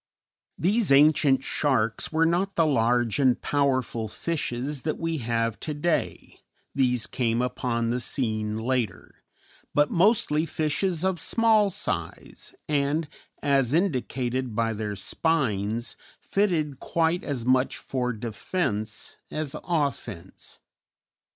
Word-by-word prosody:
These 205 Hz, +1 st, +2 dB
ancient 140 Hz, -1 st, +5 dB
sharks 115 Hz, -8 st, 0 dB
were 160 Hz, +1 st, +3 dB
not 180 Hz, +4 st, 0 dB
the 165 Hz, -, +4 dB
large 120 Hz, -4 st, +2 dB
and 130 Hz, -3 st, +3 dB
powerful 130 Hz, -5 st, 0 dB
fishes 140 Hz, +1 st, -3 dB
that 155 Hz, +2 st, -2 dB
we 165 Hz, -1 st, -2 dB
have 115 Hz, -2 st, -1 dB
to 150 Hz, -, -4 dB
day 160 Hz, +3 st, -2 dB, 0.3 s
these 125 Hz, -4 st, +2 dB
came 115 Hz, -1 st, 0 dB
upon 120 Hz, -2 st, -1 dB
the 125 Hz, -, 0 dB
scene 110 Hz, -4 st, -2 dB
later 115 Hz, -3 st, -2 dB, 0.6 s
but 145 Hz, 0 st, +3 dB
mostly 170 Hz, -5 st, +3 dB
fishes 160 Hz, +3 st, 0 dB
of 190 Hz, -2 st, +1 dB
small 220 Hz, -3 st, +3 dB
size, 200 Hz, -, -4 dB
and, 150 Hz, +2 st, 0 dB, 0.4 s
as 140 Hz, -1 st, +2 dB
indicated 130 Hz, -, -1 dB
by 115 Hz, 0 st, +1 dB
their 105 Hz, -1 st, -4 dB
spines, 115 Hz, -, -1 dB, 0.2 s
fitted 165 Hz, -9 st, 0 dB
quite 165 Hz, +1 st, 0 dB
as 130 Hz, -6 st, -3 dB
much 130 Hz, +1 st, +2 dB
for 125 Hz, -2 st, -2 dB
defence 110 Hz, -, -3 dB
as 155 Hz, -3 st, -3 dB
offence. 140 Hz, -, -4 dB
135 Hz, 115 wpm, -26 LUFS, 115-160 Hz, 0.6 s, ancient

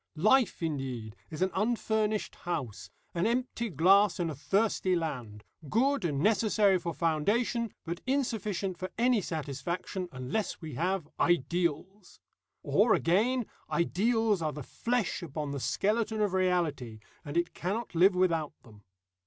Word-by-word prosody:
Life, 215 Hz, +3 st, +3 dB
indeed, 130 Hz, -8 st, -3 dB
is 160 Hz, +3 st, -2 dB
an 190 Hz, -, 0 dB
unfurnished 215 Hz, 0 st, 0 dB
house, 145 Hz, -, -4 dB, 0.2 s
an 175 Hz, +4 st, +1 dB
empty 235 Hz, -1 st, -1 dB
glass 195 Hz, +5 st, +4 dB
in 170 Hz, -2 st, 0 dB
a -, -, -6 dB
thirsty 185 Hz, -, +1 dB
land 125 Hz, -11 st, -4 dB, 0.3 s
good 270 Hz, -, +2 dB
and 145 Hz, -5 st, -1 dB
necessary 210 Hz, -1 st, +3 dB
for 170 Hz, -1 st, -3 dB
foundation, 205 Hz, +9 st, 0 dB
but 170 Hz, +1 st, -4 dB
insufficient 210 Hz, -9 st, -1 dB
for 185 Hz, -, -4 dB
any 240 Hz, -1 st, +3 dB
satisfaction 170 Hz, +4 st, -4 dB
unless 130 Hz, +11 st, -3 dB
we 160 Hz, -4 st, -7 dB
have 175 Hz, +3 st, -1 dB
ideals. 175 Hz, +3 st, 0 dB, 0.4 s
Or, -, -, +4 dB
again, 225 Hz, +9 st, +2 dB, 0.2 s
ideals 210 Hz, +3 st, +1 dB
are 155 Hz, -2 st, -1 dB
the 150 Hz, -, -6 dB
flesh 235 Hz, -, -1 dB
upon 150 Hz, -3 st, -4 dB
the 140 Hz, -, -3 dB
skeleton 215 Hz, -, 0 dB
of 205 Hz, -3 st, +1 dB
reality, 170 Hz, -11 st, 0 dB, 0.3 s
and 145 Hz, +3 st, -4 dB
it 170 Hz, 0 st, 0 dB
cannot 205 Hz, +6 st, -3 dB
live 180 Hz, +3 st, +5 dB
without 165 Hz, -5 st, +1 dB
them. 105 Hz, -4 st, -17 dB
180 Hz, 135 wpm, -30 LUFS, 155-215 Hz, 0.4 s, live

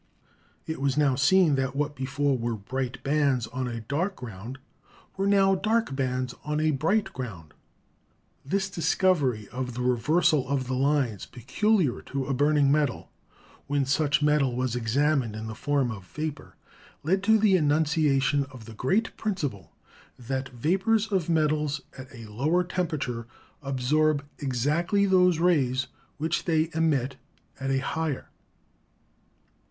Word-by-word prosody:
It 160 Hz, -3 st, -5 dB
was 140 Hz, 0 st, 0 dB
now 145 Hz, -3 st, +3 dB
seen 155 Hz, +5 st, +4 dB
that 135 Hz, 0 st, -1 dB
what 145 Hz, +1 st, -1 dB
before 135 Hz, +1 st, 0 dB
were 120 Hz, -1 st, -2 dB
bright 125 Hz, +5 st, -4 dB
bands 140 Hz, -4 st, +1 dB
on 130 Hz, +2 st, -4 dB
a 115 Hz, -1 st, -5 dB
dark 165 Hz, -, -2 dB
ground 115 Hz, +1 st, -8 dB, 0.6 s
were 195 Hz, +1 st, 0 dB
now 195 Hz, -1 st, +4 dB
dark 215 Hz, -3 st, 0 dB
bands 130 Hz, -1 st, -1 dB
on 150 Hz, 0 st, -1 dB
a 155 Hz, 0 st, +2 dB
bright 165 Hz, +10 st, 0 dB
ground. 90 Hz, -, -7 dB, 0.9 s
This 195 Hz, +8 st, -1 dB
discovery 165 Hz, -, +1 dB
of 125 Hz, -1 st, -5 dB
the 125 Hz, -, -3 dB
reversal 130 Hz, +3 st, +2 dB
of 140 Hz, -2 st, 0 dB
the 130 Hz, -, -3 dB
lines 130 Hz, -5 st, 0 dB
peculiar 145 Hz, -, 0 dB
to 135 Hz, -1 st, -4 dB
a 135 Hz, -, -1 dB
burning 145 Hz, +1 st, +3 dB
metal, 145 Hz, -4 st, 0 dB, 0.6 s
when 140 Hz, -1 st, +1 dB
such 145 Hz, +2 st, +1 dB
metal 150 Hz, -4 st, +2 dB
was 125 Hz, -1 st, -1 dB
exam 140 Hz, +5 st, +2 dB
ined 110 Hz, -3 st, -6 dB
in 110 Hz, 0 st, -6 dB
the 110 Hz, -, -5 dB
form 135 Hz, +2 st, 0 dB
of 95 Hz, -5 st, -9 dB
vapor, 155 Hz, +3 st, -6 dB, 0.5 s
led 190 Hz, +6 st, +1 dB
to 220 Hz, +1 st, +6 dB
the 210 Hz, -3 st, +4 dB
enunciation 150 Hz, -3 st, +2 dB
of 130 Hz, -5 st, -13 dB
the 115 Hz, -, -10 dB
great 190 Hz, -, 0 dB
principle 150 Hz, -, -3 dB, 0.5 s
that 130 Hz, +2 st, -4 dB
"vapors 195 Hz, -, +1 dB
of 185 Hz, -4 st, 0 dB
metals 150 Hz, -2 st, +1 dB, 0.2 s
at 130 Hz, -1 st, -9 dB
a 115 Hz, -3 st, -10 dB
lower 145 Hz, +12 st, 0 dB
tempera 175 Hz, -3 st, -2 dB
ture 115 Hz, -4 st, -4 dB, 0.3 s
absorb 140 Hz, +2 st, +1 dB
exactly 150 Hz, -, +1 dB
those 180 Hz, -3 st, +4 dB
rays 140 Hz, -7 st, +2 dB, 0.3 s
which 160 Hz, +3 st, -1 dB
they 160 Hz, -1 st, +1 dB
emit 145 Hz, -5 st, 0 dB, 0.4 s
at 135 Hz, 0 st, -3 dB
a 135 Hz, -, +2 dB
higher." 155 Hz, +1 st, -3 dB
140 Hz, 145 wpm, -27 LUFS, 125-160 Hz, 0.9 s, to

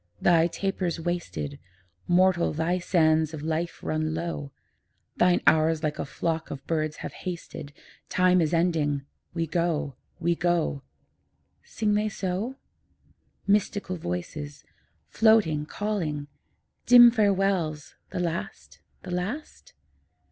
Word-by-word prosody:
'Thy 170 Hz, -1 st, +4 dB
taper's 180 Hz, -1 st, -2 dB
wasted; 165 Hz, -4 st, -4 dB, 0.5 s
Mortal, 180 Hz, 0 st, +3 dB
thy 165 Hz, +4 st, 0 dB
sands 160 Hz, -3 st, +2 dB
of 150 Hz, -, -8 dB
life 160 Hz, +2 st, -3 dB
run 155 Hz, 0 st, -1 dB
low; 165 Hz, -4 st, -4 dB, 0.7 s
Thine 180 Hz, 0 st, +4 dB
hours 160 Hz, 0 st, +4 dB
like 150 Hz, -1 st, -1 dB
a -, -, -2 dB
flock 160 Hz, +4 st, -3 dB
of 135 Hz, -1 st, -7 dB
birds 155 Hz, -2 st, -1 dB
have -, -, -6 dB
hasted: 170 Hz, -5 st, -7 dB, 0.4 s
Time 180 Hz, 0 st, +4 dB
is 155 Hz, -, +1 dB
ending; 160 Hz, -5 st, +1 dB, 0.3 s
we 165 Hz, -1 st, 0 dB
go, 160 Hz, -4 st, -1 dB, 0.2 s
we 170 Hz, 0 st, +2 dB
go.' 170 Hz, -4 st, 0 dB, 0.8 s
Sing 210 Hz, -1 st, -1 dB
they 210 Hz, +1 st, +1 dB
so? 195 Hz, +6 st, -3 dB, 0.9 s
Mystical 200 Hz, -1 st, +1 dB
voices, 145 Hz, -, -5 dB, 0.4 s
floating, 200 Hz, -10 st, +3 dB
calling; 165 Hz, -10 st, -3 dB, 0.6 s
Dim 240 Hz, -1 st, +9 dB
farewells 195 Hz, -8 st, +1 dB, 0.2 s
the -, -, -4 dB
last, 80 Hz, -, -4 dB, 0.2 s
the 185 Hz, -, -7 dB
last? 230 Hz, -, -5 dB
170 Hz, 115 wpm, -26 LUFS, 155-185 Hz, 0.9 s, Dim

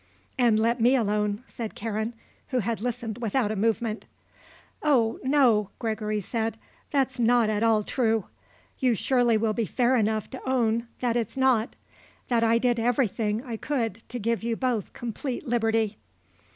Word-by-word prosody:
"And 235 Hz, -4 st, +3 dB
let 230 Hz, +2 st, +1 dB
me 245 Hz, +4 st, +5 dB
alone," 210 Hz, -1 st, 0 dB
said 225 Hz, -2 st, -6 dB
Karen, 220 Hz, +1 st, -3 dB, 0.3 s
who 255 Hz, -, -1 dB
had 230 Hz, -1 st, -1 dB
listened 235 Hz, -2 st, -3 dB
without 230 Hz, -1 st, 0 dB
a -, -, -2 dB
movement. 225 Hz, +1 st, -1 dB, 0.7 s
"Oh 245 Hz, -7 st, +2 dB
no," 255 Hz, -7 st, +3 dB
Gregory 215 Hz, -2 st, -2 dB
said, 225 Hz, +2 st, -2 dB, 0.3 s
"that's 265 Hz, -3 st, 0 dB
not 235 Hz, -2 st, +4 dB
at 210 Hz, 0 st, -1 dB
all 225 Hz, -2 st, +3 dB
true. 225 Hz, -3 st, 0 dB, 0.5 s
You 250 Hz, -3 st, +3 dB
surely 240 Hz, 0 st, +2 dB
will 215 Hz, 0 st, +1 dB
be 225 Hz, -1 st, -1 dB
fair 250 Hz, +6 st, +2 dB
enough 220 Hz, -2 st, +1 dB
to 260 Hz, -, -7 dB
own 235 Hz, -2 st, +1 dB
that 240 Hz, -2 st, +1 dB
it's 235 Hz, +2 st, -2 dB
not; 255 Hz, -4 st, +2 dB, 0.5 s
that 235 Hz, -2 st, +2 dB
I 230 Hz, 0 st, +4 dB
did 240 Hz, 0 st, +1 dB
everything 225 Hz, -2 st, 0 dB
I 235 Hz, -4 st, -5 dB
could 230 Hz, -6 st, -2 dB
to 245 Hz, -, -4 dB
give 230 Hz, 0 st, -1 dB
you 230 Hz, 0 st, -1 dB
both 240 Hz, -5 st, -1 dB
complete 240 Hz, +4 st, -5 dB
liberty." 225 Hz, -2 st, +1 dB
230 Hz, 160 wpm, -26 LUFS, 220-245 Hz, 0.7 s, me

